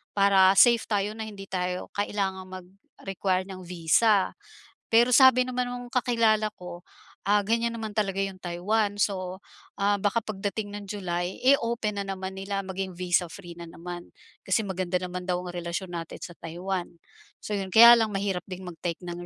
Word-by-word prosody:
para 195 -1 +5
safe 235 0 +6
tayo, 205 -1 0
na 220 - -4
hindi 200 -2 -9
tayo 180 -1 -3
kailangang 190 -2 -2
mag-require 190 0 -4
ng 185 -1 -8
visa?" 180 +4 +3 0.6
Pero 235 +2 +4
sabi 255 0 +7
naman 250 0 -2
nung 245 0 -7
kakilala 230 -4 +2
ko, 175 -1 -9 0.5
ah, 205 +1 +4
ganyan 230 +3 0
naman 220 -1 -5
talaga 195 -2 -1
yung 195 -1 -3
Taiwan, 205 +4 -1
so, 185 -1 -1 0.4
ah, 205 0 +3
baka 205 +3 0
pagdating 205 0 -4
ng 205 - -9
July, 185 -2 -4
eh, 275 +2 +6
open 230 -3 -2
na 200 - -2
naman 190 0 -5
nila, 195 0 -3
maging 190 -1 -5
visa-free 175 0 -2
na 170 - -8
naman, 175 +1 -9 0.3
kasi 190 +3 +2
maganda 185 -2 -2
naman 180 0 -5
daw 180 -1 -1
yung 180 - -7
relasyon 175 +1 -4
natin 165 0 -8
sa 175 - -9
Taiwan, 175 +2 -4 0.6
so 210 -1 -3
'yun. 190 -1 -5
Kaya 235 +1 +10
lang 220 -2 0
mahirap 195 -2 -2
din 185 -1 -8
mag-take 175 -1 -5
ng 175 0 -7
195 Hz, 170 wpm, -27 LUFS, 180-210 Hz, 0.6 s, Kaya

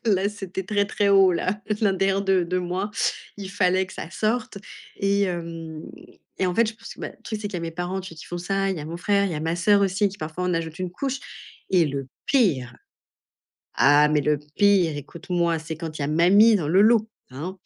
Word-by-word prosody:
là 195 -2 +2
c'était 195 -2 -6
très, 205 +1 +1
très 205 0 0
haut 195 -2 +6
là, 185 +4 -1 0.2
l'intérieur 195 -1 +2
de 190 -2 +2
de 180 +2 -1
moi, 180 +3 -3 0.5
il 195 -2 -7
fallait 190 -1 +2
que - - -13
ça 165 - -7
sorte 215 +2 -1 0.4
et 200 0 +1
hem 165 -4 -4 0.6
et 190 - +1
en 180 - -1
fait 230 +3 +3
je 220 - -5
pense 220 - -11
que, - - -15
bah, - - -4
le - - -31
truc 215 - -4
c'est 205 - -3
qu'il 200 - -11
y - - 0
a - - -3
mes 165 0 -4
parents 175 +3 -3
tu 185 -3 -9
qui 160 - -11
font 175 - -6
ça, 195 +2 -1
il 190 - -2
y - - -5
a - - -6
mon 165 +2 -5
frère, 200 +3 +1
il 185 - -3
y - - -3
a 150 - -3
ma 165 +2 -1
sœur 200 +4 +4
aussi, 195 +1 +2
qui 200 +1 -12
parfois 160 +3 -4
en 180 -1 0
ajoute 160 -1 -4
une 185 -1 -3
couche. 270 +8 -3 0.5
Et 180 -4 +4
le 140 -2 -4 0.2
pire. 145 - +1 1.0
Ah 145 +2 +5
mais 150 0 +2
le 150 +1 +1 0.2
pire, 190 -6 +3
écoute-moi, 170 +3 -2
c'est 160 0 -6
quand 160 -1 -6
il - - -3
y - - 0
a - - -2
mamie 200 +8 +5
dans 165 - -2
le 185 +4 +4
lot, 220 0 +4 0.2
hein. 165 +9 -6
185 Hz, 240 wpm, -24 LUFS, 165-200 Hz, 1.0 s, haut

